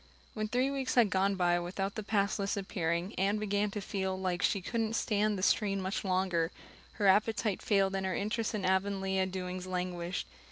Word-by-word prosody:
When 215 Hz, -1 st, -2 dB
three 250 Hz, +5 st, +1 dB
weeks 270 Hz, -2 st, -2 dB
had 230 Hz, -6 st, +5 dB
gone 195 Hz, +1 st, +2 dB
by 175 Hz, -1 st, +2 dB
without 195 Hz, +3 st, -3 dB
the 215 Hz, -, -4 dB
pass 205 Hz, 0 st, 0 dB
list 200 Hz, +1 st, -1 dB
appearing 175 Hz, -1 st, -2 dB
Anne 200 Hz, +2 st, +2 dB
began 205 Hz, 0 st, 0 dB
to 210 Hz, -, -4 dB
feel 190 Hz, -1 st, -2 dB
that 180 Hz, -1 st, 0 dB
she 200 Hz, -, +2 dB
really 190 Hz, -, -7 dB
couldn't 225 Hz, -2 st, 0 dB
stand 210 Hz, -2 st, +1 dB
the 185 Hz, -, -4 dB
strain 195 Hz, -1 st, +2 dB
much 190 Hz, +1 st, -2 dB
longer. 185 Hz, -3 st, +1 dB, 0.4 s
Her 205 Hz, -, -2 dB
appetite 210 Hz, +1 st, +3 dB
failed 195 Hz, -2 st, +2 dB
and 190 Hz, 0 st, -1 dB
her 185 Hz, -, -1 dB
interest 215 Hz, +2 st, -1 dB
in 200 Hz, -3 st, -2 dB
Avonlea 190 Hz, 0 st, +1 dB
doings 185 Hz, 0 st, -5 dB
languished. 180 Hz, -, -3 dB
195 Hz, 195 wpm, -32 LUFS, 185-210 Hz, 0.4 s, had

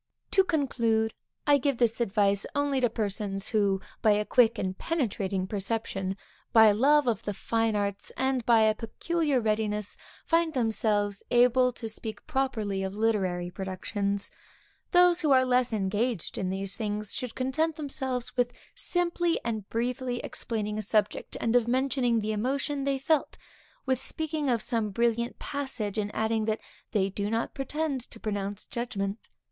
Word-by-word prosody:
To 385 Hz, -, +6 dB
conclude, 235 Hz, -10 st, +1 dB, 0.3 s
I 290 Hz, -1 st, +5 dB
give 275 Hz, -1 st, 0 dB
this 235 Hz, -1 st, +2 dB
advice 200 Hz, -2 st, +2 dB
only 285 Hz, -2 st, +1 dB
to 245 Hz, -, +4 dB
those -, -, -25 dB
persons 200 Hz, -2 st, -2 dB
who, 200 Hz, -3 st, +2 dB, 0.2 s
by 215 Hz, -, +5 dB
a 210 Hz, +1 st, +1 dB
quick 235 Hz, -1 st, +4 dB
and 190 Hz, -2 st, -2 dB
penetrating 200 Hz, -, -1 dB
perception, 195 Hz, -1 st, -3 dB, 0.3 s
by 220 Hz, -1 st, +8 dB
a -, -, +4 dB
love 285 Hz, +6 st, +4 dB
of 235 Hz, -3 st, 0 dB
the 205 Hz, -, -4 dB
fine 225 Hz, +1 st, 0 dB
arts, 200 Hz, -1 st, -2 dB
and 265 Hz, -1 st, +1 dB
by 230 Hz, -1 st, +5 dB
a 220 Hz, 0 st, +5 dB
peculiar 290 Hz, +6 st, -1 dB
readiness, 210 Hz, -2 st, -1 dB, 0.3 s
find 330 Hz, -2 st, +2 dB
themselves 210 Hz, -4 st, +1 dB
able 250 Hz, +1 st, +4 dB
to 230 Hz, -, -6 dB
speak 215 Hz, -1 st, -6 dB
properly 245 Hz, -9 st, -1 dB
of 190 Hz, 0 st, -3 dB
literary 190 Hz, -5 st, 0 dB
productions. 200 Hz, +2 st, -2 dB, 0.6 s
Those 355 Hz, -1 st, +5 dB
who 310 Hz, -, +1 dB
are 260 Hz, -1 st, +5 dB
less 250 Hz, -1 st, +2 dB
engaged 210 Hz, 0 st, -1 dB
in 185 Hz, -, -2 dB
these 195 Hz, +1 st, -1 dB
things, 210 Hz, -2 st, -2 dB
should 250 Hz, -2 st, -3 dB
content 300 Hz, +5 st, 0 dB
themselves 265 Hz, -4 st, -2 dB
with 245 Hz, -1 st, +1 dB, 0.2 s
simply 345 Hz, -1 st, 0 dB
and 220 Hz, -4 st, -3 dB
briefly 245 Hz, +1 st, -1 dB
explaining 215 Hz, -2 st, -3 dB
a -, -, -1 dB
subject, 210 Hz, 0 st, 0 dB
and 230 Hz, +1 st, +1 dB
of 240 Hz, -2 st, +4 dB
mentioning 255 Hz, -2 st, +2 dB
the 215 Hz, +1 st, -1 dB
emotion 270 Hz, +6 st, -1 dB
they 275 Hz, -1 st, +1 dB
felt; 295 Hz, +3 st, 0 dB, 0.5 s
with 260 Hz, -2 st, +1 dB
speaking 310 Hz, -2 st, -2 dB
of 235 Hz, -3 st, +1 dB
some 225 Hz, -4 st, -1 dB
brilliant 235 Hz, +3 st, 0 dB
passage, 265 Hz, -8 st, -3 dB
and 205 Hz, -1 st, -1 dB
adding 220 Hz, 0 st, +1 dB
that 220 Hz, 0 st, 0 dB, 0.3 s
they 195 Hz, -3 st, +1 dB
do 200 Hz, +1 st, -2 dB
not 225 Hz, +1 st, -1 dB
pretend 280 Hz, 0 st, -2 dB
to 225 Hz, -, -12 dB
pronounce 205 Hz, -2 st, -3 dB
judgment. 210 Hz, -3 st, -4 dB
225 Hz, 160 wpm, -28 LUFS, 205-260 Hz, 0.6 s, by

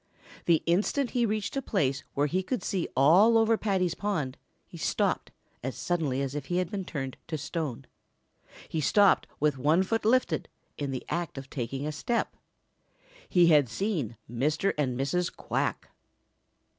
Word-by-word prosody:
The 165 Hz, -2 st, +3 dB
instant 210 Hz, +10 st, +1 dB
he 240 Hz, -2 st, +2 dB
reached 210 Hz, +1 st, -2 dB
a 275 Hz, -, 0 dB
place 140 Hz, -, 0 dB
where 145 Hz, -, +2 dB
he 180 Hz, +6 st, 0 dB
could 245 Hz, +6 st, -3 dB
see 190 Hz, -5 st, -1 dB
all 185 Hz, -, +6 dB
over 225 Hz, 0 st, +4 dB
Paddy's 190 Hz, -5 st, 0 dB
pond, 160 Hz, -12 st, -2 dB, 0.3 s
he -, -, -14 dB
stopped -, -, 0 dB, 0.3 s
as 130 Hz, +1 st, -4 dB
suddenly 150 Hz, -7 st, 0 dB
as 135 Hz, 0 st, -3 dB
if 145 Hz, -2 st, -4 dB
he 175 Hz, -, 0 dB
had 180 Hz, -1 st, -1 dB
been 195 Hz, -2 st, -3 dB
turned 135 Hz, -6 st, -5 dB
to 160 Hz, -, -3 dB
stone. 145 Hz, -3 st, -4 dB, 0.8 s
He 160 Hz, -, -2 dB
stopped 200 Hz, +6 st, +4 dB
with 145 Hz, -2 st, +1 dB
one 155 Hz, +7 st, +3 dB
foot 225 Hz, +4 st, -1 dB
lifted 250 Hz, +4 st, +2 dB, 0.3 s
in 145 Hz, -1 st, -3 dB
the 130 Hz, -2 st, -4 dB
act 170 Hz, -4 st, -3 dB
of 135 Hz, 0 st, -8 dB
taking 135 Hz, +2 st, -3 dB
a 155 Hz, -, -1 dB
step. 230 Hz, +10 st, -1 dB, 0.9 s
He 175 Hz, -2 st, +5 dB
had 145 Hz, -6 st, +5 dB
seen 140 Hz, -, -2 dB
Mr. 150 Hz, -, 0 dB
and 130 Hz, -4 st, -1 dB
Mrs. 170 Hz, +6 st, 0 dB
Quack. -, -, -2 dB
165 Hz, 165 wpm, -28 LUFS, 135-200 Hz, 0.9 s, all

